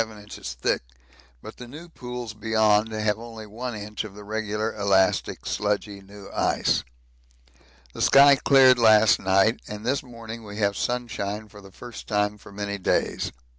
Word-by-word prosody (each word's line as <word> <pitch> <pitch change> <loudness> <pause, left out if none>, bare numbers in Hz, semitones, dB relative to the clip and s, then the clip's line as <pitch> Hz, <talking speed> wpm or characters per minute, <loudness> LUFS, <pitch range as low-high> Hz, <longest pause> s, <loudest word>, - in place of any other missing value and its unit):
In 115 - -2
Arrival 110 -1 -13
Bay 105 - -12
it 105 - -18
is - - -9
6 - - -10
to - - -30
7 - - +2
inches - - -34
thick, - - -31 0.5
but 110 - -10
the 125 - -9
new 155 +7 -10
pools 125 -7 -7
beyond 110 0 +2
have 110 -1 -1
only 115 -2 -9
I 120 +3 -6
inch 105 0 -5
of 105 -2 -10
the 105 - -10
regular 110 +1 -3
elastic 100 -2 +1
sludgy 105 -1 -2
new 100 0 -13
ice. - - +1 1.1
The - - -6
sky 140 +1 +7
cleared 130 -2 +5
last 110 -2 +6
night, 95 +5 +2
and 105 +1 -7
this 135 +3 +1
morning 115 -2 -9
we 105 -1 -9
have 100 -2 +1
sunshine 110 -4 -3
for 105 0 -14
the 95 -1 -14
first 120 +4 -10
time 105 0 0
for - - -14
many 100 0 -4
days. 90 - 0
110 Hz, 195 wpm, -25 LUFS, 105-115 Hz, 1.1 s, sky